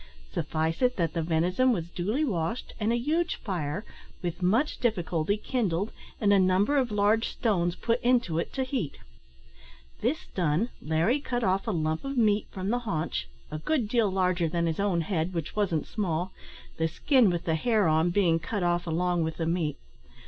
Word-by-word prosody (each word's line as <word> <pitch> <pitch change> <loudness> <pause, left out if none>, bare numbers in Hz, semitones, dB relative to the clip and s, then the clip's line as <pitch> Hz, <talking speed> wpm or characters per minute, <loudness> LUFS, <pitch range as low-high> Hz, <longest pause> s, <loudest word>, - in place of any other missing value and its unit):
Suffice 160 - -1
it 250 0 +3
that 165 -4 0
the 165 - -1
venison 175 +10 +2
was 170 -6 -2
duly 215 - 0
washed, 180 - -2
and 215 +1 +1
a 235 - +2
huge 315 +8 0
fire, 180 -1 -3 0.4
with 175 +1 -3
much 225 +12 +2
difficulty, 180 -4 0
kindled, 205 -4 -1 0.3
and 205 -2 +4
a 200 - +5
number 190 +9 +3
of 260 -3 +2
large 210 +2 +2
stones 175 -6 0
put 235 +1 0
into 240 -10 +2
it - - -3
to 265 - 0
heat. 255 - -3 1.0
This 265 +8 0
done, 175 +5 +1
Larry 165 - +1
cut 245 -4 -2
off 190 +2 +1
a - - +1
lump 155 -3 -1
of 275 -1 -4
meat 210 -3 +3
from 190 +1 -4
the 245 +2 +1
haunch 155 - -2 0.2
a 155 - -4
good 250 - 0
deal 230 -2 +2
larger 180 -3 +1
than 170 +1 0
his 165 +1 -1
own 195 -4 +1
head, 175 0 -2
which 165 +2 -3
wasn't 190 -8 0
small 185 -3 -2 0.4
the 160 - +1
skin 250 - +3
with 175 -2 -2
the 160 - +1
hair 215 +3 +2
on 160 +2 +3
being 175 -3 +3
cut 190 +4 -3
off 175 0 +1
along 175 +1 +1
with 160 0 -3
the 165 - -1
meat. 165 -3 0
185 Hz, 185 wpm, -28 LUFS, 165-225 Hz, 1.0 s, a